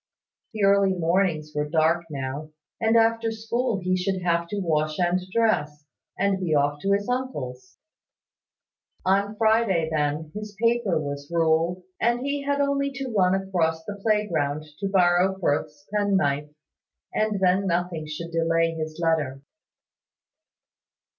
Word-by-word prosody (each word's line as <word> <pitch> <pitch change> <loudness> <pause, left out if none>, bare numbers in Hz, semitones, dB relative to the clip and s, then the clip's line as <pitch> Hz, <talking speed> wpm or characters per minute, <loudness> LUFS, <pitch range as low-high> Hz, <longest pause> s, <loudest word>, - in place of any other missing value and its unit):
The 210 - -1
early 195 -1 +4
mornings 170 -3 0
were 150 0 -2
dark 165 +2 +2
now; 140 +1 -5 0.3
and 225 0 +3
after 225 0 +2
school 225 -1 -2
he 185 +1 +1
should 185 0 -1
have 170 -1 +1
to 205 +3 -3
wash 155 -4 0
and 180 +1 +1
dress, 150 -10 0 0.3
and 195 -1 +1
be 170 -5 0
off 145 0 +1
to 200 0 +2
his 205 0 0
uncle's. 145 - -4 1.3
On 200 +3 +2
Friday 220 -7 +2
then, 150 +1 -1
his 210 -1 -7
paper 230 -6 +2
was 145 -1 -5
ruled, 165 +2 +1 0.2
and 240 +1 +1
he 280 +1 -2
had 285 0 -1
only 280 0 +1
to 265 -2 -5
run 185 -1 +4
across 170 -4 -1
the 205 +2 -6
playground 165 -9 0
to 200 - -1
borrow 185 0 +3
Firth's 150 -3 -1
penknife, 170 -9 +1 0.6
and 215 -2 0
then 190 +1 +2
nothing 170 -3 -1
should 165 +2 -6
delay 165 0 +2
his 155 0 -5
letter. 150 -5 0
180 Hz, 140 wpm, -25 LUFS, 155-210 Hz, 1.3 s, early